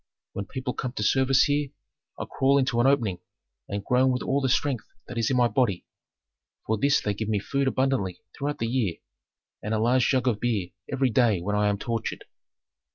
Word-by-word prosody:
When 100 - -5
people 130 -1 -4
come 125 -2 -4
to 105 - -3
service 135 +4 +4
here, 145 -1 0 0.5
I - - -4
crawl 135 +1 +2
into 130 -3 +1
an 125 - +4
opening 115 -10 +1 0.5
and 100 0 -4
groan 130 +1 +3
with 125 - -2
all 140 +1 0
the 135 - +1
strength 130 -2 0 0.2
that 125 - -8
is 115 - +1
in 130 - +1
my 120 -1 +4
body; 120 -8 0 0.8
for 110 -1 0
this 140 +4 +3
they 105 - -1
give 110 +1 -4
me 105 - +1
food 140 +7 -1
abundantly 130 -9 0
throughout 145 0 -3
the 115 - -2
year, 115 -7 0 0.7
and 110 +1 -2
a - - 0
large 120 +2 +3
jug 130 -2 +1
of 110 -4 +1
beer 105 -7 -1 0.2
every 135 -2 +1
day 110 -4 +3
when 100 +4 -2
I 105 0 +2
am 100 - 0
tortured.' 115 +1 -4
125 Hz, 205 wpm, -26 LUFS, 105-135 Hz, 0.8 s, service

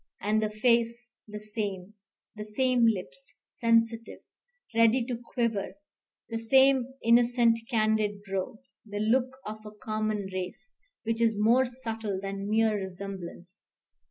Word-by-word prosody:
And 215 +2 +1
the 215 - 0
face 235 +2 +1 0.2
the 210 0 -7
same: 210 -2 -5 0.4
the 210 - -6
same 240 +2 +2
lips, - - -3
sensitive, 230 0 0 0.5
ready 230 +2 +4
to 245 -1 -3
quiver; 235 -3 -2 0.5
the 225 -1 -3
same 265 +2 +4
innocent, 235 0 +4
candid 215 -3 +1
brow; 195 +1 -3 0.3
the 205 -2 -7
look 250 +5 +1
of 215 0 -7
a 215 - -8
common 215 -1 -3
race, 185 - -6 0.3
which 230 0 -1
is 225 -2 +3
more 235 +5 +4
subtle 225 -5 -4
than 195 +1 -5
mere 220 0 +3
resemblance. 190 -2 -7
220 Hz, 130 wpm, -28 LUFS, 210-235 Hz, 0.5 s, ready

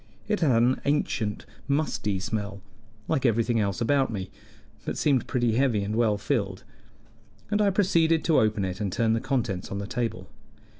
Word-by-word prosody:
It 210 -1 0
had 125 -8 +3
an 125 +2 +2
ancient, 115 -7 -1 0.2
musty 140 -9 0
smell, 100 -1 -4 0.4
like 135 - 0
everything 115 -1 +2
else 100 0 -1
about 135 +1 +2
me, 95 -3 -5 0.5
but - - -4
seemed 140 -5 +2
pretty 120 -3 +1
heavy 125 -6 +2
and 105 +2 -3
well 110 -3 +2
filled, 100 -5 -2 0.9
and 210 0 +2
I 205 - +4
proceeded 170 -5 +2
to 160 - +4
open 105 -2 +1
it 95 +2 -4
and 100 -2 -1
turn 115 +3 +1
the 115 - 0
contents 120 -9 -2
on 100 - -4
the 100 - -4
table. 115 -5 -3
115 Hz, 170 wpm, -26 LUFS, 100-140 Hz, 0.9 s, I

